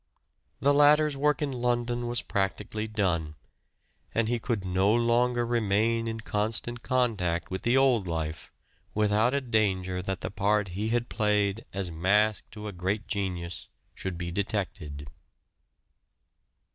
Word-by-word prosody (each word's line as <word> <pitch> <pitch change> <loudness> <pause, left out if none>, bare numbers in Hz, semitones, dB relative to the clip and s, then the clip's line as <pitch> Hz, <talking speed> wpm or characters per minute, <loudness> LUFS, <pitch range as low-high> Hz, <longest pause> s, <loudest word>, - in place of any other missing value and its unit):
The 140 +1 +4
latter's 150 +1 +5
work 150 +1 +1
in 145 - -1
London 120 -1 -1
was 120 0 -1
practically 105 +2 -2
done, 90 -8 -1 0.8
and 115 -1 +2
he 120 +1 0
could 110 -4 -2
no 95 +2 +2
longer 120 +1 +2
remain 115 0 +1
in 115 0 -4
constant 110 +3 -2
contact 105 -12 0
with 95 - -3
the 120 +2 +3
old 125 -8 +3
life 80 -2 -4 0.4
without 110 +4 +3
a 140 - +1
danger 95 -6 0
that 95 0 -4
the - - -4
part 100 0 +1
he 100 +5 -2
had 120 +1 0
played 105 -1 +1
as 95 -2 -3
mask 100 +6 +2
to 105 0 -8
a - - -4
great 95 +4 -2
genius 90 -5 -3 0.2
should 95 -2 -5
be 85 0 -4
detected. 90 -8 -3
105 Hz, 140 wpm, -28 LUFS, 95-120 Hz, 0.8 s, latter's